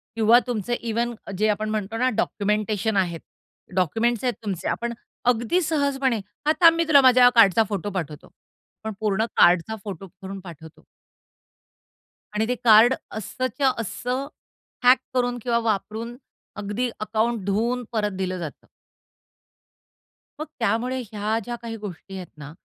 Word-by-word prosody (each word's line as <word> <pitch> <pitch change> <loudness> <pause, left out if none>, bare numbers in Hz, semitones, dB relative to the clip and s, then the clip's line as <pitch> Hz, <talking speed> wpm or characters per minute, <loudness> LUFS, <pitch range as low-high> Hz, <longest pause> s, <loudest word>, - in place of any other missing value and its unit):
किंवा 225 +1 +6
तुमचे 240 -1 -2
इव्हन 235 +1 -1 0.2
जे 215 - +2
आपण 215 +1 -1
म्हणतो 215 0 -3
ना 255 +2 +2
डॉक्युमेंटेशन 210 0 0
आहेत. 175 -3 0 0.6
डॉक्युमेंट्स 225 - +1
आहेत 250 - +1
तुमचे 195 -5 -3
आपण 235 0 -2 0.4
अगदी 240 +11 0
सहजपणे, 280 -6 0
"हां, 210 +9 -2
थांब 330 -1 +8
मी 335 - +3
तुला 285 -3 +7
माझ्या 255 -1 +6
हा 245 - +9
कार्डचा 225 -1 +6
फोटो 205 -1 -3
पाठवतो." 160 -6 -6 0.5
पण 220 -1 -4
पूर्ण 215 0 +1
कार्डचा 175 +5 +4
फोटो 195 -2 -7
करून 195 +2 -9
पाठवतो. 165 -4 -12 1.5
आणि 220 +1 +1
ते 250 - 0
कार्ड 230 +2 +7 0.2
असंच्या 255 +5 -1
असं 250 +5 -3 0.6
हॅक 250 +1 +7 0.2
करून 245 -1 0
किंवा 235 -2 +1
वापरून 220 +3 -3 0.5
अगदी 210 +5 -2
अकाउंट 220 0 -1
धुवून 230 +5 0
परत 210 -3 0
दिलं 185 -1 -2
जातं. 160 -4 -8 1.7
मग 310 - -3
त्यामुळे 240 +4 0
ह्या 215 +1 -1
ज्या 240 0 -4
काही 230 -1 -6
गोष्टी 195 -2 -9
आहेत 185 -2 -7
ना, 145 -1 -9
220 Hz, 140 wpm, -24 LUFS, 200-245 Hz, 1.7 s, हा